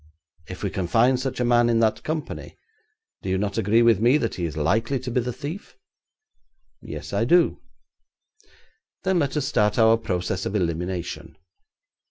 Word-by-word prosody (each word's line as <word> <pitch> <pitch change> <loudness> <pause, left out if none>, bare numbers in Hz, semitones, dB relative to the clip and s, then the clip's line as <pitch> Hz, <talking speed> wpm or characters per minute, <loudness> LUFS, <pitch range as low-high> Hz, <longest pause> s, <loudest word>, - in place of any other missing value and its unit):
If - - -8
we - - -1
can 95 -2 -3
find 120 +6 +3
such 130 0 -3
a 125 - +1
man 120 0 +4
in 115 -1 +2
that 110 -1 +1
company, 155 -1 -5 0.6
do - - -5
you 95 - +1
not 100 +2 -2
agree 110 +3 +3
with 115 -4 +4
me 120 +6 +4
that 115 -6 -2
he 90 - -3
is 80 -2 -5
likely 110 - +1
to 125 0 -6
be 125 - +1
the 125 +1 -3
thief?' 145 - -8 1.0
'Yes, - - -8
I - - +1
do.' - - +3 1.4
'Then 190 -2 +2
let 145 -1 -1
us 145 - 0
start 105 0 +1
our 115 -1 +5
process 90 -3 -2
of 105 - -4
elimination. 90 -1 -3
115 Hz, 175 wpm, -24 LUFS, 95-125 Hz, 1.4 s, our